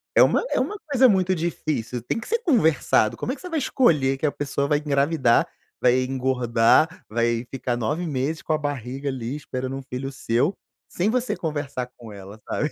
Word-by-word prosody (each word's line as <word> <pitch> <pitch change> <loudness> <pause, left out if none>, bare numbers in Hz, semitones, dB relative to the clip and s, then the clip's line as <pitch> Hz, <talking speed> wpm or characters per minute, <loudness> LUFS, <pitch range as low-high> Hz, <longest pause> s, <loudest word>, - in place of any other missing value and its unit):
é - - +8
uma - - +3
é - - +2
uma 420 - -2
coisa 260 -2 +5
muito 190 -3 +2
difícil, 155 -8 -3
tem 125 - -2
que 225 - -9
ser 465 +1 +1
conversado, 160 - +3
como 250 - -3
é - - -3
que - - -16
você 365 - -7
vai 325 -3 0
escolher 150 - +2
que 155 - -2
a 145 - +2
pessoa 140 -1 -2
vai 145 0 +2
engravidar, 140 -3 +2 0.3
vai 125 +1 +4
engordar, 130 +3 +2
vai 115 +1 0
ficar 125 -2 -2
9 135 +10 -1
meses, 145 +2 -2
com 155 - -1
a - - +2
barriga 140 -2 -4
ali 125 0 -4
esperando 130 -2 -5
um 135 - -6
filho 130 +1 -5
seu, 130 +7 0 0.3
sem 190 +5 0
você 250 0 0
conversar 145 -6 -3
com 115 -3 -11
ela, 100 +1 -11
sabe. 150 - -1
140 Hz, 200 wpm, -24 LUFS, 125-165 Hz, 0.3 s, é